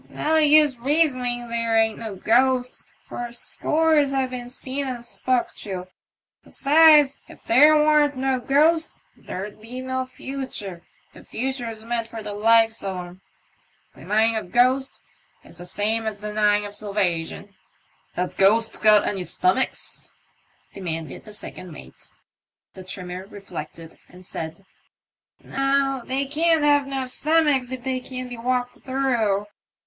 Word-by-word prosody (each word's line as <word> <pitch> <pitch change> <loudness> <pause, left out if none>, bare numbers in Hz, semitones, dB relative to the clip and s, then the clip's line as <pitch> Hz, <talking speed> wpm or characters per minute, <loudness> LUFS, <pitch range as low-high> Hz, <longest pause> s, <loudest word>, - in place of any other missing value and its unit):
" - - -27 0.2
No 315 +1 +3
use 300 -3 +5
raysoning 255 -3 0
there 230 -1 0
ain't 220 -1 +2
no 220 -3 -6
ghosts, 250 +5 +1 0.2
for 240 0 -6
scores 300 +3 +1
have 265 -1 0
been 245 -1 -6
seen 270 +2 -4
and 245 -2 -5
spoke 255 0 -1
to; 185 -3 -6 0.6
'sides, 295 -1 +5
if - - -15
there 295 +6 +6
warn't 300 -2 +3
no 265 0 0
ghosts 310 +5 +2
there'd 205 +3 -8
be 240 +3 -7
no 260 0 -3
future, 255 -9 -6 0.3
the - - -14
future's 235 -3 -4
meant 230 -1 -2
for 225 -1 -8
the 205 0 -5
likes 225 +1 +3
o' 195 -1 -3
them. 180 +1 -8 0.7
Denying 220 +2 +1
of 215 -5 -4
ghosts 255 +2 +2 0.4
is 170 - -9
the 175 - -6
same 220 +4 -1
as 210 -2 -4
denying 210 0 +1
of 205 - -8
salvagion." 200 -2 -2 0.6
Have 180 +1 -3
ghosts 220 +4 +3
got 215 -1 +5
any 195 -3 -2
stomachs? 185 +8 -1 0.3
" - - -39
demanded 165 -6 -6
the 215 - -11
second 185 -3 -8
mate. 150 - -11 0.6
The 185 - -10
trimmer 185 0 -6
reflected, 165 -5 -9
and 180 +1 -15
said, 165 +3 -7 0.8
*'No, 275 -1 0
they 265 +3 -1
can't 320 +2 +2
have 290 -1 +3
no 270 -1 -3
stomachs 285 -1 +1
if 260 -1 -6
they 260 0 -1
can 255 0 -7
be 245 - -7
walked 250 +1 -2
through." 240 -7 0
240 Hz, 145 wpm, -23 LUFS, 205-270 Hz, 0.8 s, there